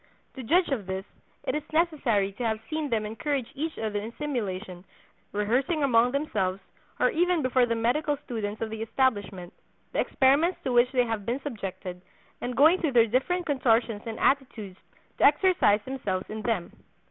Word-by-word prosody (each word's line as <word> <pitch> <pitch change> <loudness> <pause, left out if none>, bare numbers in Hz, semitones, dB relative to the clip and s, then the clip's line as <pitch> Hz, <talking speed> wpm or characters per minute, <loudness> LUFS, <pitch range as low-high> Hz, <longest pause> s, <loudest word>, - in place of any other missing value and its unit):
To 265 - -7
judge 340 +9 +2
of 230 -9 -2
this, 190 +1 -4 0.4
it - - -2
is 300 - -1
necessary 285 - +1
to 210 +5 -6
have 220 -1 0
seen 310 -2 -2
them 220 -3 0
encourage 265 +3 -3
each 315 +3 -4
other 215 -2 -2
in 215 +3 -6
simulation, 200 -10 -4 0.5
rehearsing 250 +10 0
among 245 -3 +4
themselves, 205 -10 -1 0.4
or 250 - +3
even 350 -1 +1
before 255 -1 +3
the 230 - 0
medical 280 +6 0
students 215 -3 -4
of 220 - -4
the 220 0 -5
establishment, 205 -6 -1 0.4
the - - -1
experiments 290 +7 +3
to 255 - -1
which 240 +1 +4
they 250 -2 +2
have 225 -3 -3
been 240 +6 -2
subjected; 195 -8 -6 0.4
and 245 0 -4
going 320 +6 +6
through 310 -6 0
their 235 -2 +6
different 270 +10 0
contortions 235 -6 +1
and 225 - -5
attitudes 230 -9 0 0.4
to - - +1
exercise 295 - +4
themselves 205 -8 -3
in 215 0 -5
them. 215 -7 -1
240 Hz, 170 wpm, -27 LUFS, 210-285 Hz, 0.5 s, going